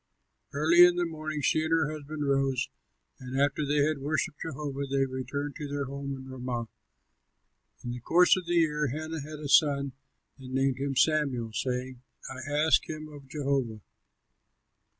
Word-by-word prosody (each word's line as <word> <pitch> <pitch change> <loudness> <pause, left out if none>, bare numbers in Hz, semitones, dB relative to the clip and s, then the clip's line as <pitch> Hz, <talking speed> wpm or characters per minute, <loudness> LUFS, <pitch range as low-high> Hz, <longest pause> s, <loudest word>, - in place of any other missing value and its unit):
Early 160 +5 +6
in 175 0 +6
the 175 0 +1
morning 155 -2 -4
she 155 +3 +2
and 160 - -2
her 160 -2 +2
husband 150 -1 -5
rose; 135 -2 +1 0.5
and 130 +1 -4
after 140 +1 +2
they 145 0 +2
had 155 -2 0
worshipped 150 +2 -2
Jehovah, 140 -2 -4
they 135 0 +2
returned 135 +2 -4
to 150 -3 -5
their 140 0 -2
home 140 +1 -5
at 130 0 -10
Ramah. 125 -3 -4 1.2
In 120 - -4
the 125 - -5
course 175 +8 +5
of 185 -2 -5
the 175 - +1
year 150 -3 +2
Hannah 155 +3 -4
had 155 +2 -8
a 150 -1 -6
son 140 -1 +4 0.5
and 130 0 -7
named 135 -1 +1
him 140 0 -2
Samuel, 130 -6 +1
saying, 125 +1 -3 0.3
"I 130 +2 -7
asked 155 +2 +3
him 155 -1 -6
of 145 -2 -12
Jehovah." 135 -6 -1
140 Hz, 170 wpm, -29 LUFS, 135-155 Hz, 1.2 s, Early